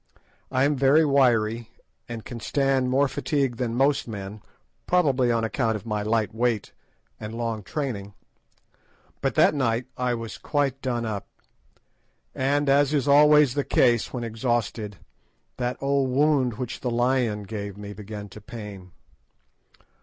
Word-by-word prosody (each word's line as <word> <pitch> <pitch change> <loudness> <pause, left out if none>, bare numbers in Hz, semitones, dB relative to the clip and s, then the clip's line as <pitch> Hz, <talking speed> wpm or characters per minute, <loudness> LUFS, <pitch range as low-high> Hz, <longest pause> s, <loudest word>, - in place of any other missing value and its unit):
I 130 0 +1
am 145 +1 +2
very 140 +4 +4
wiry, 120 -5 +2 0.4
and 115 -2 -6
can 120 - -7
stand 135 0 +1
more 135 +2 +3
fatigue 135 -3 -1
than 120 -2 -2
most 135 +2 +2
men, 100 -1 -7 0.5
probably 140 -9 +3
on 115 -1 +1
account 115 0 0
of 105 - -6
my 105 -2 -2
light 110 0 0
weight 115 -2 -1 0.5
and 110 +1 -6
long 115 -2 -2
training; 100 -6 -4 1.1
but - - 0
that - - +5
night 120 -4 0
I 125 -1 0
was 115 -1 -7
quite 140 -3 -1
done 120 -3 -2
up, 105 -3 -4 1.1
and, 140 +2 +1
as 140 +1 +4
is 140 -1 0
always 150 -1 +6
the 145 0 0
case 120 -4 +3
with 125 - -4
me - - -2
when 115 - -5
exhausted, 110 -3 -2 0.6
that 125 0 -2
old 140 -1 +1
wound 135 -3 +2
which 125 +2 -5
the 125 - -2
lion 120 -3 +1
gave 100 -1 -6
me 105 0 -7
began 105 0 -8
to 105 - -12
pain. 100 -5 -9
120 Hz, 155 wpm, -25 LUFS, 110-135 Hz, 1.1 s, always